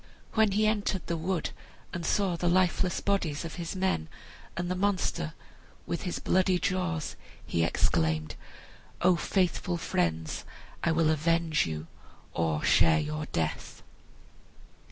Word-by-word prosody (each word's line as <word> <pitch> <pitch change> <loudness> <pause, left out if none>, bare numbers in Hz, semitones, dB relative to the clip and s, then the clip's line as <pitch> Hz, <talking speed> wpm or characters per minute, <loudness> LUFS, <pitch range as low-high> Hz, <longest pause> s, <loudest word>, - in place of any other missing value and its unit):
When 215 -3 +4
he 215 +2 +3
entered 205 -3 0
the 170 - -1
wood, 170 0 -1 0.4
and 175 - -3
saw 190 +1 +1
the 175 +1 +1
lifeless 180 0 +2
bodies 175 -6 0
of 165 - -6
his 170 +3 -4
men, 185 - 0 0.5
and 175 +1 -1
the 180 - 0
monster 185 - 0 0.5
with 170 - -2
his 180 - -3
bloody 185 0 +2
jaws, 180 -3 -1 0.3
he 85 - +1
exclaimed, 80 -2 +1 0.7
"O 180 0 +6
faithful 180 +1 0
friends, 80 - -1 0.4
I 165 - +3
will 160 -1 +3
avenge 160 - +2
you, 80 -1 -4 0.5
or 80 -2 0
share 80 -2 +5
your 75 0 -3
death." 80 -2 -3
170 Hz, 135 wpm, -29 LUFS, -, 0.7 s, O